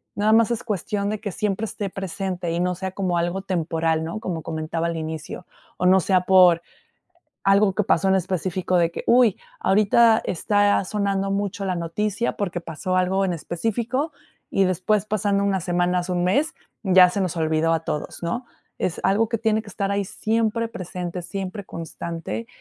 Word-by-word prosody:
nada 210 +1 +2
más 230 +1 +4
es 235 - -2
cuestión 205 -1 -2
de 215 - -2
que 205 -2 -4
siempre 205 +4 -1
esté 205 -2 -4
presente, 185 -2 -4
y 170 - -1
no 180 0 0
sea 190 +1 -4
como 185 -2 -1
algo 175 +3 -1
temporal, 165 -3 0
¿no? 165 +6 -4
Como 175 -7 -4
comentaba 160 +1 -3
al 170 - -2
inicio. 160 +2 -6 0.3
O 180 - +1
no 190 +1 +6
sea 185 0 +2
por 180 -2 +6 0.8
algo, 195 0 +4
que 210 - +1
pasó 195 -1 +2
en 190 - +4
específico 185 0 -1
de 170 -1 +2
que: - - -5
"Uy. 235 -4 +5 0.2
Ahorita 215 +3 +4
está 205 +2 +2
sonando 195 -1 -1
mucho 200 0 -2
la 185 -2 -1
noticia", 210 +7 -1
porque 180 -4 -2
pasó 170 +3 -3
algo 190 +2 +2
en 185 - 0
específico, 230 - -2 0.4
y 195 - +2
después, 185 +3 +1
pasando 205 -1 +1
unas 190 -3 0
semanas, 180 0 0
1 180 -1 0
mes, 280 +13 +1 0.3
ya 185 -1 +7
se 200 - -2
nos 180 -3 -1
olvidó 160 0 +1
a 160 - 0
todos, 155 +1 -4
¿no? 235 +9 -3 0.3
Es 175 - -2
algo 215 +3 +2
que 230 - -1
tiene 220 0 +1
que 220 - -14
estar 200 0 -2
ahí, 200 0 0
siempre 225 +3 -1
presente, 180 -3 -5
siempre 195 +2 -5
constante. 170 +5 -6
190 Hz, 180 wpm, -23 LUFS, 175-205 Hz, 0.8 s, ya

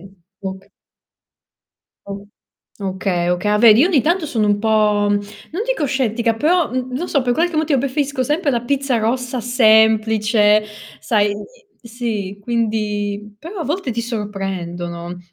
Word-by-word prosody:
un 195 +2 -15 0.3
oc 190 0 -7 1.4
O 200 0 -7 0.5
okay, 185 -2 -1
okay. 180 +3 -1
Ah 210 - +2
vedi, 225 -1 +8
io 330 - +5
ogni 325 -8 +3
tanto 335 +4 +1
sono 225 -7 0
un 205 0 +2
po', 210 -1 +2
non 205 - -3
dico - - 0
scettica, 240 -4 0
però, 325 +8 +2
mh, 255 +1 -3
non 340 +8 -3
so, 280 - +1
per 245 -1 +1
qualche 335 +4 0
motivo 310 -3 +2
preferisco 275 0 -1
sempre 300 +4 0
la 240 -3 -1
pizza 275 -1 0
rossa 250 +3 -1
semplice, 220 -2 +4 0.4
sai 205 -2 +1 0.5
sì, 225 -5 -4
quindi 210 -2 -2
però 340 - -8
a - - -2
volte 305 -1 -2
ti 235 - -2
sorprendono. 180 -6 -5
225 Hz, 145 wpm, -19 LUFS, 205-265 Hz, 1.4 s, vedi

